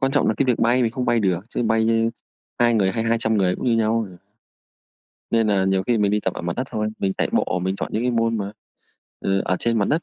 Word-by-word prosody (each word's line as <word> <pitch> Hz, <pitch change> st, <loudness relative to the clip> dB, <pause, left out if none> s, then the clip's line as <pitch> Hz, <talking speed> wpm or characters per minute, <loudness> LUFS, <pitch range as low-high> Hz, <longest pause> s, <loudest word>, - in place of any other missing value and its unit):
Quan 135 Hz, -1 st, +2 dB
trọng 145 Hz, -, +2 dB
là -, -, +2 dB
cái -, -, +2 dB
việc 125 Hz, -, +1 dB
bay 120 Hz, +2 st, +3 dB
mình 115 Hz, -, +1 dB
không 125 Hz, +2 st, -3 dB
bay 120 Hz, -1 st, +2 dB
được, 90 Hz, -4 st, +1 dB
chứ 120 Hz, -, -2 dB
bay, 110 Hz, 0 st, +2 dB
ơ, 115 Hz, -, +3 dB, 0.7 s
2 120 Hz, -1 st, +3 dB
người 95 Hz, -3 st, +2 dB
hay 115 Hz, -1 st, -1 dB
200 115 Hz, -1 st, +1 dB
người 90 Hz, -3 st, +1 dB
cũng -, -, -5 dB
như 115 Hz, -2 st, +3 dB
nhau 110 Hz, 0 st, +1 dB
à. 90 Hz, -, -14 dB, 1.1 s
Nên 115 Hz, -1 st, +2 dB
nà 100 Hz, -2 st, +2 dB
nhiều 95 Hz, 0 st, +1 dB
khi 115 Hz, +2 st, +1 dB
mình 100 Hz, -1 st, +2 dB
đi 105 Hz, 0 st, +1 dB
tập 95 Hz, -, -2 dB
ở -, -, -6 dB
mặt 85 Hz, 0 st, -3 dB
đất 130 Hz, -, -2 dB
thôi, 105 Hz, 0 st, -1 dB
mình 95 Hz, -1 st, 0 dB
chạy -, -, +1 dB
bộ, 90 Hz, -, 0 dB
mình 95 Hz, +1 st, -1 dB
chọn -, -, -4 dB
những 110 Hz, -, -1 dB
cái 125 Hz, -, +1 dB
môn 115 Hz, -1 st, 0 dB
mà, 100 Hz, +1 st, -4 dB, 0.7 s
ờ, 95 Hz, 0 st, 0 dB
ở 95 Hz, -, 0 dB
trên 115 Hz, -1 st, 0 dB
mặt 100 Hz, -, +1 dB
đất. 160 Hz, +3 st, +1 dB
110 Hz, 280 wpm, -22 LUFS, 95-115 Hz, 1.1 s, bay